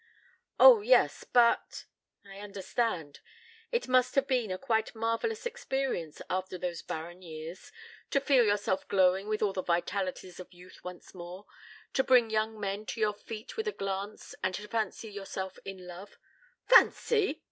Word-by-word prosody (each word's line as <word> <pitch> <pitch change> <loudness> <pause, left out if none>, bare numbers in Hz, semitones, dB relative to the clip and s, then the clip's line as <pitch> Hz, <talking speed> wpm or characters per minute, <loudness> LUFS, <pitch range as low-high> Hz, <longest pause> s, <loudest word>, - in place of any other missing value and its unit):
"Oh, - - +9
yes, - - +3
but 240 -1 +2 0.2
" - - -45
"I 195 0 -11
understand. 195 -5 -3 0.5
It 475 0 0
must 255 -1 +3
have 275 -1 +3
been 250 -5 0
a 185 - -2
quite 220 -1 -1
marvellous 230 - -1
experience, 270 - -3
after 185 0 -3
those 175 -1 -4
barren 170 +3 -7
years, 165 +1 -9 0.4
to 275 - +2
feel 275 -3 +4
yourself 205 -3 0
glowing 190 +1 +3
with 215 0 -1
all 200 -2 +1
the 185 - -2
vitalities 185 +1 -2
of 185 - -10
youth 180 +1 -15
once 180 -1 -9
more; 180 +2 -9 0.5
to 265 - +2
bring 245 -4 +4
young 220 0 -1
men 200 +1 -3
to - - -5
your 215 -1 +2
feet 215 +3 -9
with 445 0 -2
a - - +1
glance 195 - -5
and 185 0 -1
to 210 +2 -7
fancy 225 0 -2
yourself 195 -2 -6
in 190 -2 -8
love 180 +3 -10 0.3
" - - -34
"Fancy!" 450 -4 +4
205 Hz, 165 wpm, -30 LUFS, 185-240 Hz, 0.5 s, Oh